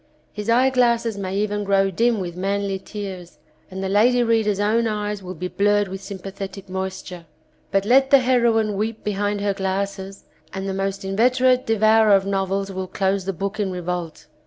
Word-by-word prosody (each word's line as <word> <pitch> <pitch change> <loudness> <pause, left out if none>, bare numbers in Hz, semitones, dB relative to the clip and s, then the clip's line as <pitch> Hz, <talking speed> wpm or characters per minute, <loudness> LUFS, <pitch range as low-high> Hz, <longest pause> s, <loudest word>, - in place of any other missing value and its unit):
His 210 +1 -5
eyeglasses 235 -2 +3
may 195 -1 -4
even 205 0 -1
grow 195 -1 +2
dim 230 +4 +1
with 175 -2 -5
manly 195 +1 -2
tears, 190 -4 -8 0.3
and 190 0 -6
the - - -1
lady 240 +5 +3
readers' 220 -3 +1
own 225 +3 +2
eyes 210 -1 -3
will 185 0 -7
be 180 +3 -4
blurred 205 +2 +1
with 190 +1 -6
sympathetic 195 0 -8
moisture. 185 -2 -6 0.4
But 195 0 +1
let 265 +4 +4
the 280 - +8
heroine 235 -5 +2
weep 220 +2 -3
behind 205 0 -1
her 200 -1 0
glasses 195 0 -4 0.3
and 190 +1 -4
the 195 - -2
most 195 0 -3
inveterate 250 +5 +2
devourer 220 -1 +4
of 195 0 +1
novels 195 0 -1
will 190 0 -4
close 190 0 -1
the 195 - -1
book 200 +4 -4
in 200 -2 0
revolt. 180 -2 -5
200 Hz, 175 wpm, -22 LUFS, 190-220 Hz, 0.4 s, the